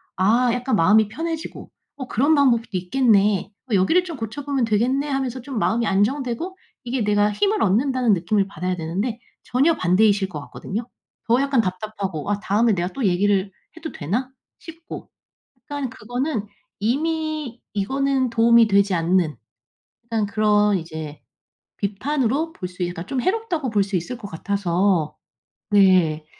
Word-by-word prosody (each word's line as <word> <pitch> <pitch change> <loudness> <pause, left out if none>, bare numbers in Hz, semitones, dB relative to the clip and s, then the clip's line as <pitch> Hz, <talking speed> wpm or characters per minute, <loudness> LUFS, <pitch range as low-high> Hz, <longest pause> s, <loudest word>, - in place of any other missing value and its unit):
아 230 +7 +3
약간 250 0 0
마음이 210 +5 +4
편해지고 325 +6 -5 0.3
'어 265 - -6
그런 280 +8 +2
방법도 245 -5 +3
있겠네, 200 0 +2 0.2
어 - - +3
여기를 260 - +3
좀 340 -4 -7
고쳐보면 265 +3 -2
되겠네.' 245 +6 +1
하면서 265 -3 -2
좀 255 -2 -4
마음이 230 +2 +1
안정되고 255 - -1 0.3
이게 245 -1 -2
내가 205 0 +2
힘을 405 - +1
얻는다는 245 +3 +2
느낌을 195 +3 +1
받아야 185 -2 -3
되는데 190 +8 -3 0.2
전혀 290 +6 +2
반대이실 195 +2 +3
것 165 -5 -7
같거든요. 220 +10 -6 0.4
더 235 +2 +4
약간 275 -4 +2
답답하고 195 -3 -4
아 205 - 0
'다음에 215 +2 +2
내가 175 -1 -1
또 270 -4 -3
얘기를 195 +1 +2 0.3
해도 325 -1 -6
되나?' 230 - -3 0.3
싶고. 330 0 -10 0.6
약간 285 -3 -2
그거는 245 0 -3 0.3
이미 305 +2 -2
이거는 265 +5 0
도움이 230 0 +5
되지 200 -1 +3
않는 170 -1 +1 0.7
약간 220 -2 0
그런 210 -1 +2
이제 160 -3 -7 0.6
비판으로 270 +8 -1
볼 185 - -6
수 180 0 -5
있 175 - 0
그러니까 175 0 -6
좀 265 0 -2
해롭다고 370 - -1
볼 205 -2 +3
수 195 0 -4
있을 240 +9 -5
것 220 -4 -8
같아서 180 -3 0 0.6
네 185 -6 +4
220 Hz, 325 characters per minute, -22 LUFS, 195-265 Hz, 0.7 s, 도움이